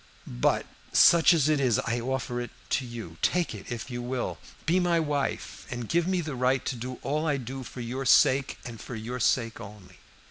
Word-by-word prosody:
But - - +1 0.3
such 170 -1 +7
as 160 -5 +3
it 155 -2 +3
is 125 -6 +3
I 120 +1 -1
offer 120 0 -2
it 120 - -5 0.2
to 135 - +1
you. 115 -9 -8
Take 175 -6 +1
it 105 +1 -9
if 120 +2 -5
you 120 0 -3
will. 125 0 -3 0.3
Be 175 +3 +3
my 175 -2 +2
wife, 145 -3 -2
and 120 -2 -5
give 170 +5 +1
me 185 -1 +1
the 155 -3 -5
right 130 0 +1
to - - -1
do 125 +1 -6
all 150 +3 -1
I 145 -2 +2
do 130 +1 -6
for 125 0 -8
your 125 +3 -4
sake, 135 +2 +4
and 115 -2 -8
for 120 - -7
your 115 +3 -5
sake 115 -1 +1
only." 100 -2 -12
130 Hz, 210 wpm, -28 LUFS, 120-145 Hz, 0.3 s, such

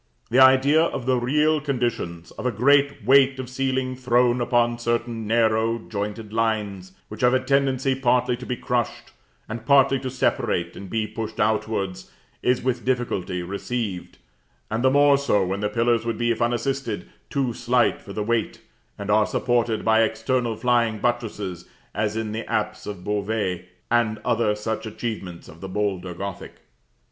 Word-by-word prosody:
The 125 - +4
idea 130 +4 +6
of 165 -7 -1
the 130 0 +2
real 150 +5 +2
conditions, 120 - -3
of - - -4
a - - +1
great 140 +2 +3
weight 135 +1 +5
of 130 -1 -5
ceiling 130 0 -1
thrown 125 -1 +2
upon 120 -1 +1
certain 120 -1 -2
narrow, 115 0 +2
jointed 105 0 -5
lines, 105 -5 -1
which 105 - -9
have 125 +1 +4
a - - +3
tendency 135 0 +1
partly 125 -1 +2
to 125 - -9
be 125 - -1
crushed, 120 -2 -2 0.4
and 110 0 -6
partly 135 +1 +4
to 130 0 -4
separate 130 0 -1
and 100 - -9
be 110 +1 -1
pushed 110 0 -6
outwards, 105 -3 -1 0.3
is 125 0 +1
with 125 -2 -1
difficulty 100 -8 -1
received; 100 +1 -4 0.5
and 110 +3 -1
the 130 - +5
more 140 0 +5
so 105 -8 +2
when 95 +2 -2
the 105 0 -1
pillars 115 +1 +1
would 115 -1 -2
be, 120 0 +1
if 115 - -2
unassisted, 120 -3 -1 0.2
too 135 -4 -1
slight 120 +1 +1
for 100 - -11
the 105 +1 -3
weight, 115 0 -1 0.4
and 100 0 -3
are 105 0 +4
supported 120 -2 0
by 110 0 +4
external 115 +2 0
flying 120 -2 +1
buttresses, 105 -6 -2 0.3
as 105 +1 -1
in 110 -1 -3
the 110 +2 -5
apse 105 0 -2
of 100 -4 -6
Beauvais, 105 -3 -2 0.3
and 115 -2 +2
other 115 -2 +2
such 110 +1 -4
achievements 105 -6 -6
of 80 - -14
the 95 - -6
bolder 95 -3 -2
Gothic. 100 +1 -6
115 Hz, 165 wpm, -24 LUFS, 105-125 Hz, 0.5 s, idea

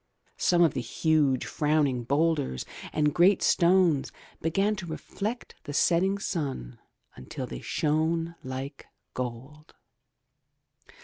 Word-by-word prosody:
Some 175 -1 +4
of 160 - +3
the - - -2
huge, 145 -2 +1
frowning 145 -5 +1
boulders 140 - 0 0.3
and 150 -1 +1
great 180 +3 +4
stones 170 -5 +3 0.3
began 195 +6 +1
to 190 -3 -6
reflect 210 +8 -5
the 145 - -5
setting 185 +5 +3
sun 135 - -4 0.4
until 65 - -6
they 60 -1 -7
shone 160 +2 0
like 130 +2 -6 0.3
gold. 130 +5 -7
155 Hz, 110 wpm, -28 LUFS, 135-170 Hz, 0.4 s, Some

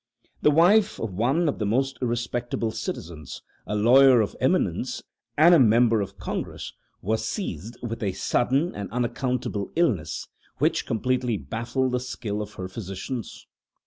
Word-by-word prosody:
The - - +5
wife 195 +8 +4
of 110 -5 -4
one 135 - +1
of 145 - -1
the 105 - 0
most 135 +5 0
respectable 120 -1 -2
citizens 85 -8 -6 0.2
a 105 - -2
lawyer 125 +4 +6
of 105 - 0
eminence - - 0 0.3
and 165 +4 +7
a 170 - +7
member 115 -2 +4
of 100 0 -6
Congress - - -5 0.3
was 110 +3 0
seized 110 - -4
with 115 0 -4
a 100 -3 0
sudden 135 - +1
and 100 -1 -6
unaccountable 125 -3 -2
illness, 105 - 0 0.3
which - - +1
completely 125 0 0
baffled 115 - -2
the 125 - 0
skill 115 -4 -4
of 105 - -8
her 95 - -5
physicians. 100 +4 -6
120 Hz, 145 wpm, -25 LUFS, 105-130 Hz, 0.3 s, and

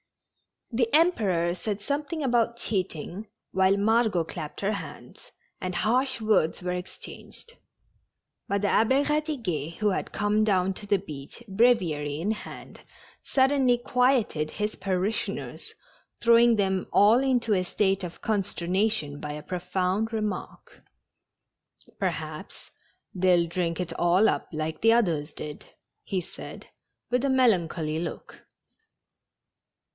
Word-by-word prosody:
The 230 0 +1
Emperor 200 - +3
said 200 +3 -4
something 290 +6 -2
about 235 -2 +2
cheating, 190 -2 -2 0.2
while 190 +1 +3
Margot 220 -3 +2
clapped 155 -2 -7
her 200 +1 +1
hands, 205 - -8 0.3
and 185 -1 -4
harsh 250 +6 +1
words 215 -7 +2
were 180 - -1
ex 180 0 -5
changed, 470 +1 -7 0.9
but 200 0 0
the 205 - +2
Abbe 260 +6 +3
Eadiguet, 260 - -2
who 210 +3 +1
had 190 - -3
come 210 +1 +1
down 190 -2 +2
to 205 - -5
the 200 0 +3
beach, 150 +3 -8
breviary 180 -10 +2
in 195 +6 0
hand, 220 - -8 0.4
suddenly 265 -2 +3
quieted 240 - +1
his 210 0 -3
parishioners, 190 +2 -3 0.4
throwing 235 0 +5
them 190 -3 0
all 215 +4 +6
into 250 -5 +1
a 185 -2 +1
state 195 0 +1
of 175 -1 -7
conster 200 -5 -2
nation 185 -7 0
by 150 -1 -5
a 150 0 -7
profound 185 +4 -1
remark. 210 -4 -5 0.6
" - - -28
Perhaps - - -4 0.4
they'll 180 -2 +3
drink 170 0 -2
it 175 -2 -3
all 180 +5 +4
up - - -2
like 155 0 -3
the 225 +1 +6
others 165 -10 +1
did," 150 -1 -7 0.4
he 190 -2 -2
said, - - -10 0.4
with 250 +1 +1
a 275 - +1
melancholy 175 -11 +2
look. 170 - -7
200 Hz, 130 wpm, -27 LUFS, 175-230 Hz, 0.9 s, all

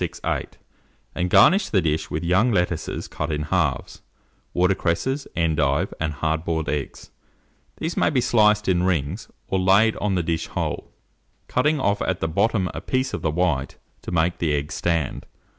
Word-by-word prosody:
468, 85 - -3 0.6
and 90 0 -1
garnish 195 - +5
the 100 - +3
dish 80 -3 -1
with - - -3
young 95 +8 +3
lettuces 90 -4 -1
cut 75 0 -4
in 75 0 -1
halves, 75 -5 -1 0.5
water 90 +2 +2
cresses, 130 - -1
endive, 80 -4 +1
and 80 -1 -1
hard 80 +2 -1
boiled 80 -2 -2
eggs: 75 -2 -4 0.7
these 160 +1 -3
may - - +2
be 135 - +1
sliced 105 -3 +3
in 90 -2 +2
rings, 90 +1 -1 0.2
or 95 - 0
laid 100 +4 +4
on 100 -2 0
the 90 - 0
dish 80 0 -2
whole, - - -4 0.6
cutting 150 +4 +1
off 100 -5 +1
at 95 -1 -1
the 80 - -1
bottom 100 +3 +1
a - - -5
piece 130 0 -1
of - - -3
the 80 - 0
white, 75 -5 -1 0.2
to - - -7
make 85 0 +1
the 80 -3 +1
egg 70 +1 -3
stand. 85 -5 -2
90 Hz, 175 wpm, -23 LUFS, 80-100 Hz, 0.7 s, garnish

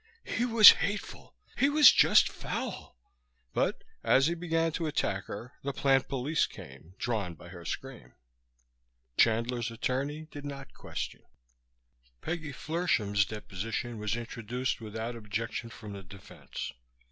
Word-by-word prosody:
"He 240 - -1
was 230 -3 +10
hateful! 205 +1 -4 0.2
He 275 - +3
was 295 0 +9
just - - +6
foul!" - - -5 0.6
But - - 0 0.2
as 135 +1 +4
he 165 - +2
began 165 -1 0
to 165 +1 -2
attack 100 -9 -1
her 115 +6 -8
the 140 0 -3
plant 135 -1 +2
police 140 +4 0
came, 70 +7 -13
drawn 105 -7 -2
by 85 - -13
her 85 -1 -10
screams. 135 -2 -7 1.0
Chandler's 115 - +2
attorney 135 +6 -2
did 145 - -8
not 140 -2 -8
question. - - -6 1.0
Peggy 155 - -4
Flershem's 125 - 0
deposition 110 +3 -5
was 105 0 -1
introduced 120 +2 -3
without 110 +2 -5
objection 115 +1 -4
from 110 -3 -9
the 100 - -7
defense. 95 +1 -9
120 Hz, 130 wpm, -30 LUFS, 105-150 Hz, 1.0 s, was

